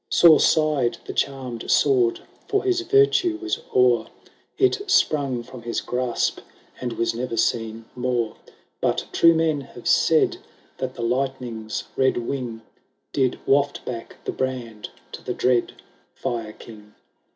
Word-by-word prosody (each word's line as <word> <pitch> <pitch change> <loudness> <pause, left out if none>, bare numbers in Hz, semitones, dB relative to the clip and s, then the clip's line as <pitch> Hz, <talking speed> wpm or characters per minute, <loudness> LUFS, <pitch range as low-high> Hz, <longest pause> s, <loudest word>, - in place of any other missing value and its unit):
Sore 165 -3 +7
sighed 150 -6 +2
the - - -6
charmed 130 -4 -3
sword, 125 -5 +3 0.3
for 405 - +1
his 370 -2 +1
virtue 365 -2 +3
was 345 0 -2 0.2
o'er; 125 -2 +4 0.5
It 390 +1 +2
sprung 140 - +2
from 125 0 -11
his 115 0 -2
grasp, 125 -1 -1 0.4
and 125 -2 -3
was 115 0 0
never 120 0 -4
seen 115 0 -1
more; 125 -3 -1 0.5
But - - 0
true 165 0 +5
men 160 -3 +1
have - - -10
said, - - +3 0.4
that - - -3
the 120 - -5
lightning's 120 -3 -2
red 130 0 +2
wing 120 -2 -4 0.5
Lid 130 -3 +1
waft 140 +1 +1
back 115 -2 -6
the - - -1
brand 120 -5 -4 0.2
to - - -8
the - - -3
dread 125 -2 +1 0.4
Fire 115 -3 -4
King. 105 -2 -14
125 Hz, 140 wpm, -23 LUFS, 115-145 Hz, 0.5 s, Sore